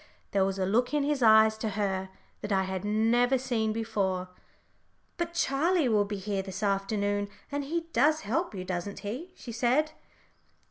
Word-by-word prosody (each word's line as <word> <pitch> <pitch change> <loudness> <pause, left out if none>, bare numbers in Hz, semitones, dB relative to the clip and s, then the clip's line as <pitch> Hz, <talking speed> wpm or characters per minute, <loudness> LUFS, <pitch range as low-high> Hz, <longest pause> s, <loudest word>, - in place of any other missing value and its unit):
There 195 -1 +3
was 195 0 -1
a 190 - 0
look 240 +9 +1
in 295 - +2
his 290 -1 0
eyes 220 -1 +6
to 220 - -1
her 190 -2 -1 0.3
that 210 - -5
I 190 -1 +3
had 190 0 -4
never 230 +5 +3
seen 240 -4 -1
before. 195 -5 -1 0.9
"But 340 0 -3
Charlie 320 0 +2
will 210 -2 +3
be 205 0 -4
here 195 0 -2
this 190 +2 -6
afternoon, 205 0 0 0.2
and 285 0 -2
he 335 +4 -1
does 305 +6 +3
help 330 - -1
you, 185 -1 -5
doesn't 180 +2 -4
he?" 255 - -5
she 240 - -9
said. 250 +7 +1
220 Hz, 175 wpm, -29 LUFS, 195-265 Hz, 0.9 s, eyes